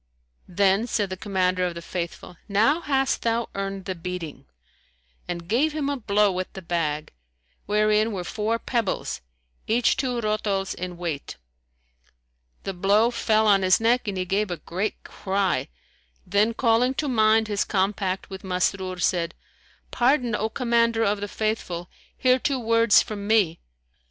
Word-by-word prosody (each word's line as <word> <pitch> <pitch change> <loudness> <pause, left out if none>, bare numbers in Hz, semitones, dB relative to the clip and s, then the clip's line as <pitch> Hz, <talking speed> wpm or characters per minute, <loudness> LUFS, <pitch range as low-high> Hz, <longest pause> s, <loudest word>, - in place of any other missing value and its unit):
Then 195 +4 +2
said 205 -4 -1
the - - -2
Commander 185 -2 0
of 175 -1 -1
the 170 - -6
Faithful, 175 0 -5
"Now 225 +11 +3
hast 270 -3 0
thou 230 0 0
earned 195 -1 -4
the 190 - -2
beating," 175 -3 -6 0.8
and 170 -1 -5
gave 280 - +2
him 290 -2 -1
a - - -1
blow 210 -3 +2
with 185 0 -4
the 190 - -8
bag, 155 -3 -2 0.5
wherein 215 +1 +2
were 190 -4 -3
four 220 +3 -1
pebbles 230 - -2 0.5
each 230 +2 +3
two 255 -3 -1
rotols 210 -3 -1
in 180 -1 -6
weight. 165 -5 -5 1.3
The 195 - -3
blow 205 +6 +3
fell 220 -2 +2
on 200 -2 +5
his 185 -1 +4
neck 235 +1 +2
and 200 -2 -2
he 185 - -1
gave 200 +3 0
a 175 - -3
great 190 +7 -4
cry, 195 0 -1 0.6
then 205 +5 +2
calling 245 +2 +2
to 300 - -1
mind 220 -3 +3
his 205 -1 0
compact 190 -1 -1
with 190 -1 -8
Masrur, 185 0 -1
said, 170 -2 0 0.6
"Pardon, 245 -1 +2
O 215 +1 0
Commander 230 -2 +2
of 205 -1 0
the 205 - -2
Faithful! 195 -5 -3 0.3
Hear 255 0 +3
two 275 +1 0
words 230 -1 +4
from 205 -2 -6
me." 205 -7 +3
205 Hz, 155 wpm, -25 LUFS, 185-230 Hz, 1.3 s, on